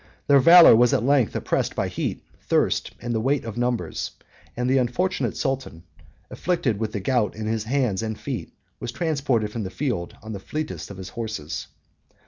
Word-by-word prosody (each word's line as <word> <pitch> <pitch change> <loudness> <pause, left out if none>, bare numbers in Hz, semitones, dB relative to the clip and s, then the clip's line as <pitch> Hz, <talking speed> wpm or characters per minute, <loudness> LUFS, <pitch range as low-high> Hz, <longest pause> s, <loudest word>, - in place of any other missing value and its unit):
Their 140 -1 +6
valor 170 0 +9
was 120 +1 +4
at - - 0
length 135 -3 +2
oppressed - - -1
by - - 0
heat, - - -3 0.2
thirst, - - +1
and 120 0 -3
the 110 - 0
weight 135 +2 0
of 110 -2 -5
numbers; 120 -1 -2 0.5
and 125 0 0
the 130 +1 +3
unfortunate 130 - -1
sultan, 130 -11 -3 0.5
afflicted 135 - -1
with 110 -1 -2
the 105 - -3
gout 115 +1 0
in 110 0 -5
his 110 0 -1
hands 120 -6 0
and 110 -1 -4
feet, 120 - -5 0.3
was - - -4
transported 140 -10 0
from 115 - -4
the 95 - -4
field 105 -6 -3
on 110 0 -6
the 100 - -5
fleetest 155 +9 -5
of 100 - -9
his 95 -1 -7
horses. 110 -10 -5
120 Hz, 185 wpm, -24 LUFS, 110-135 Hz, 0.5 s, valor